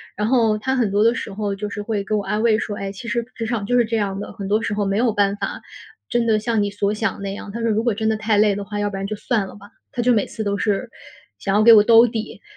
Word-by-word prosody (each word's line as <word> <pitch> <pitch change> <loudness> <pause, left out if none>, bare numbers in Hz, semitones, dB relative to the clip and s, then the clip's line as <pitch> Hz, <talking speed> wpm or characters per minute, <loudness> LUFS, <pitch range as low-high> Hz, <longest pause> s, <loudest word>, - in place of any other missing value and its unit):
然 210 - -1
后 225 -3 +3
他 260 +5 -1
很 240 -5 +1
多 205 +1 +3
的 230 +1 +4
时 205 - -5
候 205 0 -2
就 205 +1 -5
是 210 - -5
会 205 -1 -2
给 215 +2 -1
我 205 - -1
安 210 +2 -1
慰 225 -2 +4
说： 205 -3 -4
“唉， 195 0 -4
其 200 +4 -10
实 235 0 -1
职 230 - -4
场 225 -3 -2
就 245 +4 +1
是 240 - +5
这 225 +1 -1
样 195 -2 -2
的， - - -6
很 195 - -6
多 210 +3 +1
时 205 - -2
候 205 0 -1
没 195 +1 0
有 235 +1 +2
办 200 -1 +1
法 - - -4 0.5
真 240 -1 +1
的 220 -2 +3
像 220 -1 0
你 205 - -2
所 205 0 -1
想 215 -2 -1
的 - - -13
那 195 0 -4
样。 200 0 -8
“他 230 +3 -5
说：” 230 - +1
如 215 +1 0
果 235 -2 +1
真 220 +2 -2
的 220 - +1
太 215 0 +1
累 205 -1 +4
的 200 - -4
话， 205 0 -5
要 205 0 0
不 200 - -7
然 195 - -3
就 215 - -4
算 220 -2 0
了 - - -11
吧。” 205 -1 -14 0.2
他 245 - -2
就 245 +1 +3
每 210 -3 +2
次 220 - -6
都 200 -1 -1
是 210 +4 -1 0.5
想 195 - -1
要 210 - +4
给 230 +1 +9
我 210 -2 +8
兜 230 +2 +7
底。 220 -1 -5
215 Hz, 345 characters per minute, -21 LUFS, 205-230 Hz, 0.5 s, 给